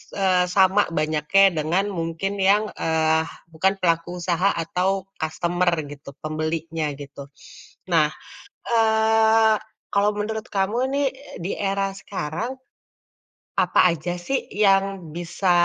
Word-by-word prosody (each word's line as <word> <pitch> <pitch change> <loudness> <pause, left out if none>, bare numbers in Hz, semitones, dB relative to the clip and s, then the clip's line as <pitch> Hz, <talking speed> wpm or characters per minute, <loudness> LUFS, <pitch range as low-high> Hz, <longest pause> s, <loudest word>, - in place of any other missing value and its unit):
eee, 185 -2 +3
sama 190 +2 +4
banyaknya 155 +5 +3
dengan 165 +6 +1
mungkin 165 +2 -3
yang, 205 +3 +3
eee, 160 0 +1 0.3
bukan 185 +4 +2
pelaku 170 0 0
usaha 180 +2 +1
atau 185 +3 -1
kastemer 175 +3 0 0.2
gitu, 140 -1 -10
pembelinya 155 0 -2
gitu. 140 0 -10 0.7
Nah, 155 -3 +4 0.6
eee, 220 -1 +4 0.4
kalau 200 +1 +3
menurut 220 +1 -3
kamu 195 +3 0 0.2
nih, 285 0 +2
e 265 +2 -14
di 190 - -2
era 195 -1 0
sekarang, 195 - -5 1.0
apa - - +3
aja 170 +1 -3
sih 180 +10 -2
yang 195 -4 +2
bisa 175 +2 -1
180 Hz, 115 wpm, -23 LUFS, 160-200 Hz, 1.0 s, sama